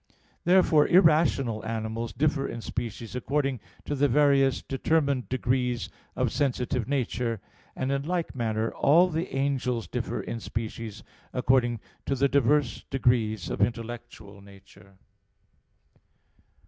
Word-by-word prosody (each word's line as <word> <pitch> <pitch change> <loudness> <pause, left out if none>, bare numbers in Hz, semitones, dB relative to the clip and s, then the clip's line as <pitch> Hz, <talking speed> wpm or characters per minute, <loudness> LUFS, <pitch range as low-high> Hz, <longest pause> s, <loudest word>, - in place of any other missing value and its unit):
Therefore 175 -4 +5
irrational 155 - +3
animals 110 +1 -3
differ 145 -2 0
in 115 - -6
species 115 0 -5
according 135 0 -1 0.3
to - - -2
the 145 0 +3
various 140 0 +3
determined 140 -1 0
degrees 125 -2 0 0.3
of - - 0
sensitive 125 -3 -1
nature; 125 -4 -1 0.4
and 130 +1 -2
in 140 0 0
like 175 -1 -1
manner 110 -2 -1
all 170 +6 +4
the 165 -1 -3
angels 130 -6 -1
differ - - -3
in 115 - -5
species 110 -1 -5 0.3
according 125 -3 +2 0.3
to 140 - +1
the 140 +1 +3
diverse 140 -2 +2
degrees 110 -8 +1
of - - -3
intellectual 115 -2 -4
nature. 100 -1 -17
125 Hz, 120 wpm, -27 LUFS, 115-140 Hz, 0.4 s, Therefore